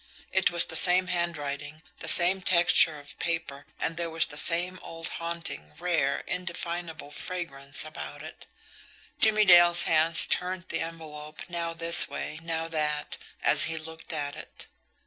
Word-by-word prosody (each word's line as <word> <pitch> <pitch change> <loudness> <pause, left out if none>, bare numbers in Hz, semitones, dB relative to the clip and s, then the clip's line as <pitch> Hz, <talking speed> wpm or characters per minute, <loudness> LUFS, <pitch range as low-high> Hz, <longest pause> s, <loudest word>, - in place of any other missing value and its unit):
It - - +2
was - - +2
the - - -6
same 185 +1 +4
handwriting, 155 -3 -4 0.2
the - - -8
same 180 +4 +4
texture 170 -3 +4
of 145 0 -14
paper, 165 -5 -4
and 165 - -3
there 170 -1 -3
was 165 0 +3
the - - -11
same 175 +4 0
old 165 0 -7
haunting, 170 - -5
rare, 175 -1 -1
indefinable 170 -3 -5
fragrance 145 -6 -4
about 150 -1 -9
it. 155 - -12 0.7
Jimmie 215 -1 +5
Dale's 175 -2 +7
hands 160 +1 +5
turned 180 0 -1
the - - -2
envelope 155 -2 -8
now 170 -1 -4
this 170 +1 +6
way, 155 - -6
now 165 0 -3
that, 150 -2 -3 0.3
as - - +3
he 160 0 -4
looked 160 +1 -10
at 145 -3 -4
it. - - -8
165 Hz, 150 wpm, -27 LUFS, 155-175 Hz, 0.7 s, Dale's